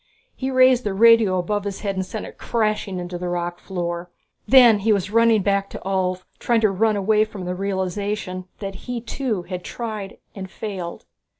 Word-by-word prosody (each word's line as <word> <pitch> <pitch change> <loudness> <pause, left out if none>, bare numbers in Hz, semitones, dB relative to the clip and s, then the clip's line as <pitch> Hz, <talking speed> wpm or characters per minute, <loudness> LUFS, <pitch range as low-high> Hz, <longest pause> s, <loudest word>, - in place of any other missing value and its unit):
He 265 - -3
raised 255 -1 +5
the 205 -2 -2
radio 225 -3 +6
above 200 +3 -1
his 200 -1 -5
head 200 -2 -2
and 190 - -1
sent 205 +3 -6
it - - -12
crashing 215 -4 -1
into 175 0 -5
the 180 0 -3
rock 175 0 -3
floor. 175 -2 -4 0.4
Then 245 -5 +7
he 220 +2 +1
was 200 -1 0
running 230 -2 +4
back 200 0 +1
to - - -8
Ulv, 185 -1 -1 0.2
trying 235 -2 +2
to 215 -3 +3
run 215 +3 +2
away 210 +2 +3
from 210 -4 -7
the 180 - -2
realization 190 0 -3
that 195 -1 -5 0.2
he 245 -1 -2
too 230 -4 -3
had 180 0 -6
tried 215 -4 -6 0.2
and 190 -2 -7
failed. 190 -5 -6
200 Hz, 190 wpm, -22 LUFS, 185-220 Hz, 0.4 s, Then